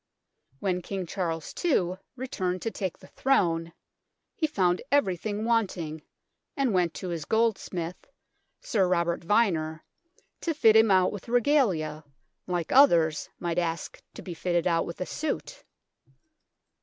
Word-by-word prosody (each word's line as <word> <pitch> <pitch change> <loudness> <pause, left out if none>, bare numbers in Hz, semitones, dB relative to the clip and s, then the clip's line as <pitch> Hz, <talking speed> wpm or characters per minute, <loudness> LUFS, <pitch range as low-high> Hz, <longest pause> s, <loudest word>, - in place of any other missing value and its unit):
When 180 -2 -1
King 190 +1 -4
Charles 165 -3 -3
II 185 - +2 0.2
returned 185 -8 -3
to 225 - -1
take 190 -5 -4
the - - -16
Throne 170 -11 +1 0.6
he 315 - +1
found 185 -10 +1
everything 215 -5 +1
wanting, 185 -9 0 0.6
and 270 -5 +1
went 175 -3 +1
to 185 - -5
his 165 -3 -3
goldsmith, 195 -6 -1 0.5
Sir 195 -5 +1
Robert 170 -1 +1
Vyner, 165 -5 +1 0.6
to 330 -2 -2
fit 220 -7 +5
him 220 0 +6
out 185 -2 +4
with 205 +3 -8
Regalia, 215 - +2 0.4
like 175 -3 -2
others 165 - +5
might 170 -1 -1
ask 165 -2 -3
to - - -9
be 180 - -6
fitted 175 0 0
out 165 -2 +1
with 170 - -7
a - - 0
suit. 310 +8 -4
185 Hz, 135 wpm, -27 LUFS, 170-225 Hz, 0.6 s, him